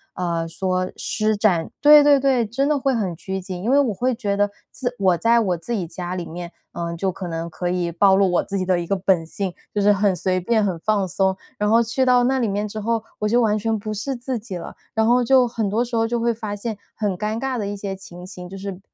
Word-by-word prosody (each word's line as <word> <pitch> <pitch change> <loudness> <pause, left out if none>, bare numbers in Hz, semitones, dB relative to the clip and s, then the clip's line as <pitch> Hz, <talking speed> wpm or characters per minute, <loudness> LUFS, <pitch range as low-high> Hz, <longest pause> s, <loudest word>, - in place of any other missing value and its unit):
呃， 170 -2 -1
说 185 +2 -2
施 215 -1 0
展 185 -6 +2
对 295 0 +8
对 290 -1 +6
对， 260 -3 +2
真 255 +6 -1
的 300 0 +2
会 270 0 +1
很 195 -7 -1
拘 190 +3 -4
谨。 185 -1 -6
因 225 - -1
为 280 - +5
我 255 -7 +2
会 250 +6 0
觉 205 -4 -1
得， 205 0 +2 0.2
自 250 -1 -3
我 185 -3 +3
在 230 +5 +4
我 190 -6 +1
自 170 +8 -8
己 195 -6 -1
家 175 +2 -5
里 175 -2 -4
面， 175 +1 -7 0.2
呃， 170 0 -4
就 190 +2 0
可 185 0 -6
能 165 0 -4
可 175 +2 -3
以 175 -1 -1
暴 190 +3 +4
露 195 -1 +3
我 175 - +2
自 200 - -4
己 185 - -1
的 180 -1 +2
一 170 - -4
个 195 - +1
本 190 -3 +2
性， 185 +3 -4 0.2
就 - - +1
是 205 +1 +5
很 200 -1 +2
随 185 +1 0
便、 215 +3 +1
很 180 -4 -2
放 200 +1 +1
松。 190 +1 0 0.2
然 210 0 +1
后 230 +2 +5
去 240 +3 0
到 250 -1 +5
那 265 +2 +2
里 235 - +1
面 205 +1 -1
之 215 +1 -6
后， 225 +1 -1 0.2
我 210 - 0
就 240 +3 +3
完 220 -3 +3
全 220 +1 0
不 215 +1 -5
是 260 +6 -3
自 250 0 -4
己 210 -4 -7
了， 170 - -8 0.2
然 220 0 +3
后 245 +2 +4
就 255 0 +5
很 225 -3 -2
多 225 +4 +1
时 235 0 -5
候 225 0 +2
就 240 +1 -1
会 235 0 +1
发 215 -2 -5
现， 220 +2 -4 0.2
很 205 -3 -1
尴 215 +3 -2
尬 265 -1 -2
的 205 - -2
一 205 0 -4
些 195 -1 -4
情 180 -2 -11
形。 180 -1 -9
就 195 - -8
是 195 -1 -6
205 Hz, 290 characters per minute, -22 LUFS, 185-230 Hz, 0.2 s, 对